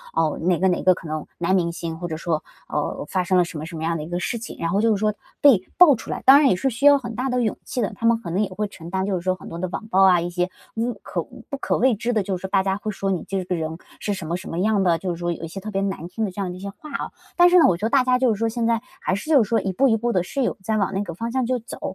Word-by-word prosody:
呃， 160 -2 +1
哪 175 +1 +2
个 190 - +3
哪 180 - 0
个 185 -1 +5
可 165 - -10
能 155 -1 -4
男 175 +2 +1
明 170 -2 +1
星 165 -1 -5
或 175 - -4
者 160 -2 -4
说， 160 -1 -2 0.2
哦， - - -3
发 185 +2 0
生 185 0 +2
了 180 - +4
什 170 - -8
么 150 - -5
什 165 0 -7
么 160 - -5
样 165 +1 0
的 150 - -5
一 155 - -8
个 175 0 -2
事 210 +6 -2
情， 230 - -8
然 165 - -1
后 195 +4 +1
就 230 - +3
是 210 - +2
说 210 0 +1 0.3
被 265 -10 +6 0.2
爆 335 -6 +8
出 - - -10
来， - - -4
当 270 +2 +9
然 290 -2 +5
也 - - +3
是 270 +9 0
需 245 +3 -3
要 285 0 +8
很 240 -4 -6
大 255 +4 -1
的 250 -1 +1
勇 220 -3 0
气 250 - -3
的。 205 - -1
她 230 - -5
们 230 0 +5
可 175 - -6
能 195 +4 +1
也 200 - -2
会 210 +3 -3
承 170 -4 -11
担 190 +1 -1
就 200 -1 -1
是 180 - -2
说 185 +1 0
很 175 - -12
多 165 - -7
的 185 - -2
网 215 +4 -6
暴 195 -3 +3
啊， 185 -2 +6
一 170 +1 -2
些 180 +1 -1 0.3
物 235 +2 -1
可 - - -3
不 280 - -9
可 - - 0
谓 250 0 +3
知 235 +4 -2
的， 215 -4 +1
就 190 -1 -2
是 190 - -6
大 190 0 +2
家 195 0 0
会 215 +1 -4
说 195 -1 -2
你 180 - -2
这 195 -1 -2
个 180 - -1
人 160 -1 -3 0.2
是 205 - -2
什 185 - -6
么 170 +2 -1
什 190 - -9
么 165 - -4
样 210 +1 +2
的， 170 -3 +3
就 185 +1 -3
是 170 - -4
说 175 0 -2
有 170 - -6
一 - - -3
些 165 - -7
特 210 +3 -7
别 195 -2 -1
难 190 -4 -3
听 220 +5 -4
的 195 - -4
这 200 - -5
样 185 -2 -2
一 - - -9
些 200 +1 -5
话 305 +9 -12
啊。 275 - -4 0.3
但 350 0 +7
是 360 0 +6
呢， - - +6
我 180 - +3
觉 205 - -3
得 - - +1
大 275 -2 +5
家 255 0 +3
就 250 -3 +3
是 205 - -6
说， 230 - +1
现 230 0 -2
在 230 -1 +1 0.2
还 - - 0
是 200 +11 -4
就 285 -7 +6
是 - - -6
说 230 - +3
一 195 - -2
步 270 +8 +3
一 225 - +3
步 240 +2 -1
地 180 -3 +2
是 275 +9 -3
有 250 - 0
在 220 +2 0
往 195 -3 0
那 195 +1 -1
个 175 -4 -6
方 230 +8 -4
向 260 -1 0
就 250 +1 0
走。 230 - -10
195 Hz, 385 characters per minute, -23 LUFS, 175-230 Hz, 0.3 s, 当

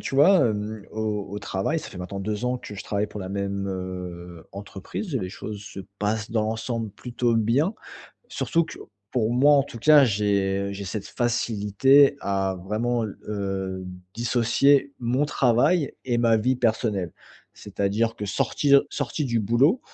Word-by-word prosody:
Tu - - -5
vois, 180 +7 +6
hem, 105 0 -4
au 105 -2 -3
au 100 - -4
travail, 100 +9 -1
ça - - -8
fait 95 - -10
maintenant 90 +2 -5
2 105 +3 -3
ans 125 0 0
que 105 - -9
je 95 - -6
travaille 100 0 -1
pour 105 - -8
la 95 - -5
même, 100 0 -3
heu, 90 -2 -6
entreprise. 100 - -6
Les 95 -7 -3
choses 100 +2 -7
se 100 -1 -8 0.2
passent 105 +1 -1
dans 110 -2 +1
l'ensemble 110 0 -3
plutôt 120 +2 -1
bien. 125 - +2 0.5
Surtout 170 0 0
que - - -10 0.3
pour 115 -2 +1
moi, 135 +4 +5
en 140 - +5
tout 130 -4 -9
cas, 150 +4 +7
j'ai 100 -3 +1
j'ai 100 0 -6
cette 100 +1 -5
facilité 120 +4 +3
à 95 -1 -1
vraiment 115 +4 0
l 105 - -6
heu, 95 -2 -3 0.3
dissocier 125 +4 +3
mon 125 +4 +1
travail 140 +4 +2
et 120 -2 0
ma 115 -1 +4
vie 125 +4 +1
personnelle. 110 -7 0 0.4
C'est-à-dire 110 +3 -1
que 105 - -4
sortir 140 +7 +3
sorti 140 +2 -2
du 120 -3 0
boulot, 130 - +3
110 Hz, 165 wpm, -25 LUFS, 100-125 Hz, 0.5 s, cas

